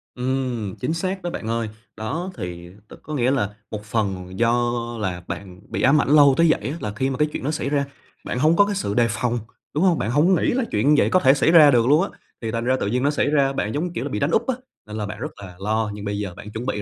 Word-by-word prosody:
Ừm, 125 -5 -2
chính 130 +5 -2
xác 185 +3 -2
đó 175 - -2
bạn 115 - -6
ơi. 115 -1 -1 0.3
Đó 160 - -3
thì 85 -3 -6 0.2
đ - - -12
có 155 - -7
nghĩa 130 -3 +2
là 125 -8 +1 0.2
một 105 -1 -5
phần 95 -4 -3
do 120 +1 +2 0.3
là 90 -4 -3
bạn 95 -2 -7
bị - - -3
ám 145 +3 +5
ảnh - - -2
lâu 145 -2 +7
tới 170 - +5
vậy 125 -6 +1
á 155 - -4
là 105 -7 -4
khi 130 +5 0
mà 135 - -3
cái 150 - +2
chuyện - - -5
đó 145 - 0
xảy 145 - -2
ra, 140 -1 +1 0.4
bạn 125 - -3
hông 155 +4 +4
có 205 - +5
cái 205 0 -2
sự 180 - -2
đề 120 +2 +3
phòng, 120 +1 -1 0.3
đúng 150 - +1
hông? 180 -4 +4
Bạn 110 - -1
hổng 160 +8 +4
nghĩ - - 0
là 260 +1 +1
chuyện 105 +7 +2
như 150 - +5
vậy - - +2
có 185 - +4
thể 135 -5 +5
xảy 150 +3 +3
ra 155 -4 +8
được 120 -2 +3
luôn 150 +4 +5
á, 200 - -3 0.3
thì 115 -2 -3
thành 115 +1 -2
ra 130 +1 +3
tự - - -1
dưng 125 +4 0
nó 140 - +3
xảy 145 - 0
ra, 140 -2 +2
bạn, 110 -5 -2
giống 150 - -1
như 180 - -3
kiểu - - -2
là, 145 - -3
bị 105 - -3
đánh 140 +3 0
úp 225 +7 +1
á 260 - +1 0.3
nên 105 - -6
là 105 - -2
bạn 105 0 -7
rất 150 +5 -4
là 90 -3 -10
lo. 110 +2 -1
Nhưng 105 0 -7
bây 100 0 -2
giờ 100 -3 -4
bạn 105 - -10
chuẩn 110 +3 -5
bị 105 -5 -2
125 Hz, 300 wpm, -22 LUFS, 105-150 Hz, 0.4 s, ra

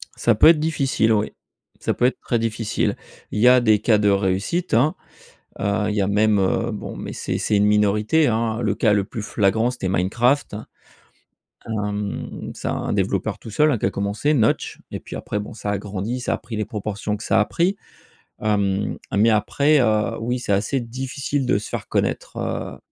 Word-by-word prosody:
Ça 115 -3 +2
peut 110 - +6
être 160 -2 +7
difficile 140 -7 +1
oui, 105 0 +1 0.5
ça - - -1
peut 125 - +1
être 130 - +1
très 120 - 0
difficile. 115 -1 -1 0.4
Il - - -2
y 125 - +5
a 125 0 +7
des 110 -3 +4
cas 110 -3 +3
de 105 -1 +2
réussite, 100 - 0
hein. 145 +7 +3 0.6
Heu, 105 +1 0
il 105 - -2
y 105 - +1
a 95 - +1
même, 105 0 +3
heu, 115 +5 +1
bon, 105 - -6
mais - - -6
c'est - - -3
c'est 105 - 0
une 100 - +4
minorité, 105 +8 +3
hein, 115 -1 0
le - - 0
cas 110 - +2
le 100 -1 +2
plus 110 0 -6
flagrant 110 +3 +1
c'était 110 -7 -4
Minecraft, 115 +10 +1
hein. 110 - -7 1.0
Hem, 105 -2 -4
c'est - - -6
un - - -2
développeur - - -1
tout 115 - -10
seul, 150 +7 +3
hein, 125 - +1
qui - - -2
a - - +3
commencé, 100 +9 0
Notch, 110 -6 +1
et - - -4
puis - - -9
après 105 - -3
bon, 105 +3 -7
ça 105 -2 -4
a 105 - 0
grandi, 105 +5 -4
ça - - -1
a - - -1
pris 115 - -8
les 110 - -1
proportions 105 0 -3
que - - -9
ça - - +2
a 105 - +3
pris. 180 +7 0 0.6
Hem, 100 -2 0 0.2
mais 110 +3 +5
après, 140 +7 +3
heu, 110 -3 +1
oui 125 +2 -2
c'est 105 - -2
assez 105 +7 +1
difficile 130 +3 -3
de 125 - +2
se 105 - -7
faire - - -5
connaître, - - -2
heu - - -4
110 Hz, 205 wpm, -22 LUFS, 105-125 Hz, 1.0 s, être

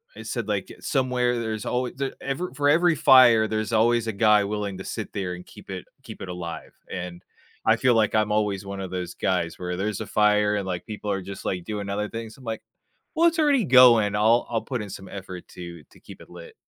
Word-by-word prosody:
it - - -9
said, - - -3
like, - - -2
"Somewhere 125 -3 0
there's 110 -2 -4
alway 125 0 -1
the 135 0 -3
ever 140 +6 -3
for 145 +1 0
every 170 +2 +4
fire, 125 -7 +6
there's 110 0 -2
always 115 +1 +3
a - - 0
guy 105 0 +4
willing 100 -1 -3
to - - -6
sit 110 +1 -6
there 95 -3 -3
and 90 - -11
keep - - -15
it - - -6 0.2
keep - - -10
it 95 - -6
alive," 85 -2 -7 0.2
and, 90 -1 -6 0.4
I 110 - +5
feel 125 +1 +3
like 110 -1 +2
I'm 105 -1 +2
always 105 -2 0
one 100 0 -6
of 95 - -5
those 90 -1 -4
guys 85 -3 -1
where, 90 -1 -3
there's 100 +1 -2
a - - -5
fire 105 -1 +3
and, 100 -2 -2
like, 90 -2 -4
people 105 -1 -5
are 95 -1 -1
just, 95 +1 -8
like, 90 -2 -2
doing 105 -2 -4
other 105 +1 -2
things. 115 -1 -7
I'm 135 - -16
like, 110 -1 -4 0.5
"Well, 335 +1 +5
it's 330 0 -2
already 285 -6 +3
going, 120 - +6
I'll 110 +3 +3
I'll 115 -2 -1
put 120 0 -4
in 105 - -8
some 95 0 -9
effort 95 -2 -8
to 85 -3 -9
to - - -20
keep - - -13
it - - -14
lit." 85 -1 -12
105 Hz, 235 wpm, -25 LUFS, 95-120 Hz, 0.5 s, fire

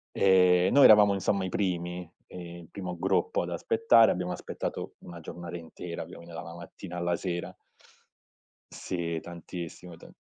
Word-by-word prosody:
Ehm, 90 -2 +5
noi 140 - +7
eravamo 105 -2 +8
insomma 100 0 0
i - - -3
primi, 90 -2 -2 0.2
ehm, 90 - -10 0.2
il - - -17
primo 90 -3 -6
gruppo 95 0 +1
ad 90 - -4
aspettare, 115 - +4
abbiamo 90 0 -2
aspettato - - -5
1 85 -1 -10
giornata 85 +1 -7
intera, 85 0 -7
quindi 85 -1 -12
dalla 85 0 -8
mattina 85 +1 -9
alla 85 0 0
sera. 85 0 -4 1.2
Sì, 85 -2 -3
tantissimo 85 0 -8
tan - - -15
90 Hz, 145 wpm, -28 LUFS, 85-95 Hz, 1.2 s, eravamo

